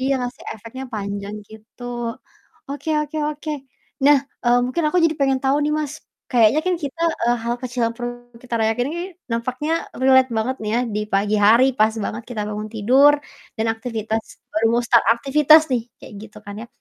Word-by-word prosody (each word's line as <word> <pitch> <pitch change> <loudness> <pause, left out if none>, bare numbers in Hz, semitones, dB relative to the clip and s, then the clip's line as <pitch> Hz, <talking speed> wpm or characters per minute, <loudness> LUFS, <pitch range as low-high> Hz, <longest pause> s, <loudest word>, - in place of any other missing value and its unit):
iya 265 +1 +1
ngasih 245 0 -5
efeknya 230 +5 -9
panjang 200 0 -4
gitu. 220 +2 -15 0.9
Oke 285 +3 -6
oke 300 +1 -5
oke. 305 +1 -6 0.5
Nah, 290 0 +7 0.3
eee, 240 0 +4
mungkin 255 +7 -1
aku 330 - -1
jadi 325 - +3
pengen 270 -1 +2
tau 270 +2 +3
nih 300 - 0
Mas, 295 -1 -3 0.4
kayaknya 240 +3 +4
kan 365 - +2
kita 285 +4 -6 0.2
eee, 240 +1 +3
hal 235 +1 0
kecil 245 0 -4
yang 230 - -3
perlu 245 -1 -4 0.3
kita 245 -2 -5
rayakan 225 +3 +1
ini 345 - -4 0.3
nampaknya 255 +6 -2 0.3
relate 260 0 +5
banget 250 +4 -1
nih 210 - -2
ya 240 - +2
di 210 - 0
pagi 205 +2 +2
hari 230 +4 +6
pas 220 +1 +4
banget 225 +4 -4
kita 225 -4 -3
bangun 210 0 -5
tidur 260 +7 +5 0.4
dan 220 - -1
aktivitas 225 -1 -3 0.3
baru 220 +1 +2
mau 240 +1 +2
start 235 -1 +4
aktivitas 300 +5 +5
nih 245 -2 +1 0.2
kayak - - -12
gitu 215 -1 -12
kan 205 - -8
ya. - - -13
245 Hz, 185 wpm, -21 LUFS, 220-270 Hz, 0.9 s, Nah